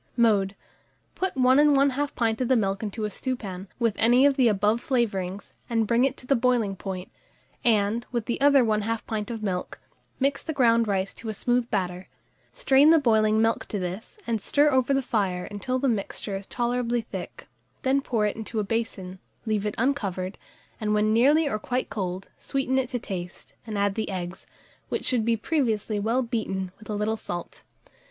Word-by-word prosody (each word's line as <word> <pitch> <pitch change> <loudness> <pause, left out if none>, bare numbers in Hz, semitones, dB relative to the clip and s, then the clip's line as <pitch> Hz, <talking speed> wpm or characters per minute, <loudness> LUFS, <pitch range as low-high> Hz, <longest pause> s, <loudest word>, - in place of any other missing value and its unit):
Mode. 205 -4 +3 0.6
Put 380 -6 -2
1 255 +1 +5 0.2
1/2 280 +1 +1
pint 225 0 0
of 250 - +1
the 260 - +4
milk 195 -3 0
into 215 0 -3
a 210 - -3
stewpan, 200 -6 -4
with 230 -3 +1
any 245 +4 +5
of 285 -1 +4
the 255 -3 +4
above 210 +2 +2
flavourings, 200 -7 -2 0.2
and 225 -2 +1
bring 235 +4 +3
it 270 0 -1
to - - -10
the 275 - +3
boiling 235 -5 +1
point, 190 -1 -6 0.5
and, 220 0 +2
with 235 -3 -2
the 240 - -3
other 280 -2 +6
1/2 215 +1 -1
pint 215 0 -3
of 225 -2 -5
milk, 185 -3 -3 0.4
mix 275 +1 +1
the 315 - -3
ground 230 -4 +3
rice 195 -1 -1
to 225 - -8
a 215 - -4
smooth 245 +3 0
batter; 180 -1 -2 0.4
strain 290 - +4
the 330 - +7
boiling 220 -5 +3
milk 225 0 0
to 210 - -3
this, 185 - -5
and 225 -3 -1
stir 295 +7 +3
over 260 0 +2
the 275 -1 +2
fire 195 -7 -1
until 210 +6 -3
the 270 +2 0
mixture 205 -3 -2
is 195 0 -6
tolerably 240 -1 0
thick; - - -8 0.4
then 270 +1 +2
pour 230 -6 0
it 210 - -1
into 220 0 -4
a - - +1
basin, 195 -4 -3 0.3
leave 210 -2 0
it 210 - -3
uncovered, 200 -8 -1 0.4
and 215 -1 0
when 215 +1 +2
nearly 290 +7 +4
or 215 -6 -1
quite 250 +4 -2
cold, 185 -2 -3
sweeten 265 -1 0
it 255 -2 -2
to 255 - -2
taste, 180 -6 -7
and 215 -2 -3
add 200 0 +1
the 220 +2 -3
eggs, 185 -1 -5 0.4
which - - -2
should 245 -3 +2
be 230 0 +1
previously 225 -6 0
well 230 +5 +1
beaten, 195 -6 -3
with 215 - -15
a 210 - -2
little 215 +2 -1
salt. 175 -5 -7
225 Hz, 190 wpm, -26 LUFS, 200-250 Hz, 0.6 s, the